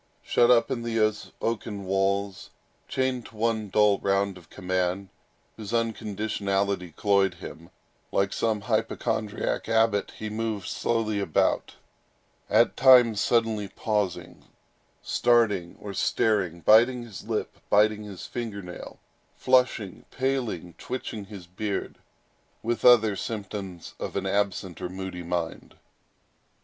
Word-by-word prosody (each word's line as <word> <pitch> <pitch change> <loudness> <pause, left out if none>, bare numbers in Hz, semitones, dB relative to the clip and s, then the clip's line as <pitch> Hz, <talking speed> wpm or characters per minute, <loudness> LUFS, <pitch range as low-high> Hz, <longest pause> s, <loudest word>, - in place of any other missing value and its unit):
Shut 120 0 +3
up 125 +2 +4
in 125 -3 -1
these 110 -2 0
oaken 105 -3 -3
walls, 95 0 -1 0.4
chained 130 -2 -1
to - - -17
one 110 -2 0
dull 105 0 +4
round 100 0 +1
of 90 -3 -15
command, 95 +1 -2 0.5
whose 110 0 -7
unconditionality 100 -5 -1
cloyed 100 -3 +2
him, 85 -1 -10 0.4
like 100 0 +1
some 110 -2 0
hypochondriac 105 +2 -1
abbot 110 -2 +2
he 110 - -5
moved 110 -2 -3
slowly 110 -3 -1
about, 95 -6 0 0.7
at - - +4
times 125 -5 +6
suddenly 115 -3 +1
pausing, 105 -2 -3 0.6
starting, 105 -8 +2
or 100 -1 -7
staring, 95 -6 +1
biting 120 +5 +5
his 110 -6 -10
lip, - - -3
biting 105 +1 +4
his 100 -4 -8
finger 110 -5 -5
nail, 90 0 -9 0.4
flushing, 125 -6 +1
paling, 125 -10 -2
twitching 115 -4 -5
his 100 -3 -10
beard, 100 +3 -4 0.6
with 120 +1 -2
other 110 -4 +6
symptoms 100 -4 -6
of - - -5
an - - -1
absent 100 -3 -1
or 90 - -3
moody 95 -1 -6
mind. 85 -1 -4
105 Hz, 120 wpm, -26 LUFS, 95-115 Hz, 0.7 s, times